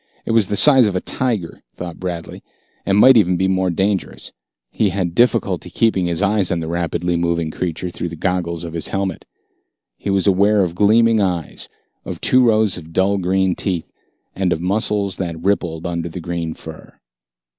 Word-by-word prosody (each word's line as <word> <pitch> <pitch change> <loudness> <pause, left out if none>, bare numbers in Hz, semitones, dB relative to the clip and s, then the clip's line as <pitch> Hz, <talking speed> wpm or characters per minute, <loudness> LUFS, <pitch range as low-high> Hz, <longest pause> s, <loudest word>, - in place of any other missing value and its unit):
It - - -2
was 115 -4 +3
the 100 - -1
size 130 0 +6
of 100 - -2
a - - +1
tiger, 110 -9 -3
thought 85 -2 -7
Bradley, 90 -2 -5 0.5
and 100 0 +3
might 130 +5 +8
be 120 - +6
even 95 -1 +1
more 95 0 +1
dangerous. 95 +2 -2 0.4
He 105 - +1
had 90 -2 -2
difficulty 105 -6 +1
keeping 95 -1 +1
his 85 +3 -1
eyes 100 -2 +1
on 85 - -1
the 80 - -4
rapidly 85 +1 -1
moving 85 -1 -1
creature 90 +1 -4
through 85 - -4
the 85 - -7
goggles 85 -1 -2
of 85 -1 -7
his 85 - -3
helmet. 95 -3 -3 0.7
He - - -5
was 95 -1 +1
aware 100 +1 +3
of 85 -2 -2
gleaming 110 +3 +4
eyes, 90 -6 -3 0.3
of - - -6
two 130 0 +4
rows 110 -5 +2
of 80 -1 -13
dull 95 +2 +2
green 95 0 +1
teeth, 90 -4 -3 0.4
and 95 -2 0
of 80 - 0
muscles 100 +1 -1
that 85 -3 -4
rippled 90 -5 -1
under 85 -1 -3
the 85 - -7
green 85 -1 -4
fur. 80 -1 -12
95 Hz, 185 wpm, -19 LUFS, 85-100 Hz, 0.7 s, might